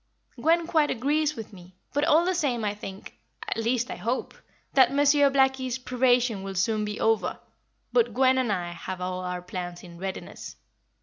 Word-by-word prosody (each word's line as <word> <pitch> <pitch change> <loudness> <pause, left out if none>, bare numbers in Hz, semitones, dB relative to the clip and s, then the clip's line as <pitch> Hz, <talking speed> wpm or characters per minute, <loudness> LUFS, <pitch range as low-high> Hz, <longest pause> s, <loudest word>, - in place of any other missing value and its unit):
"Gwen 330 +1 +3
quite 315 -3 +2
agrees 295 +5 0
with 225 -2 -8
me, 180 -1 -14 0.2
but 290 - +1
all 320 +3 +4
the 370 - +1
same 260 -10 0
I 205 - 0
think 195 -2 -9 0.3
at - - -1
least, 235 +2 0
I - - -5
hope 240 +4 -2 0.4
that 265 -2 +5
Monsieur 285 0 +4
Blackie's 265 -2 +1
probation 245 -4 +1
will 195 0 -6
soon 215 +3 +1
be 210 0 -4
over, 220 -5 +1 0.5
but 475 -2 +3
Gwen 260 0 +3
and 245 -4 0
I 175 -3 -2
have 180 +2 -6
all 180 0 -3
our 180 -1 -4
plans 175 -1 -6
in 170 -2 -12
readiness. 190 0 -6
235 Hz, 180 wpm, -26 LUFS, 190-275 Hz, 0.5 s, that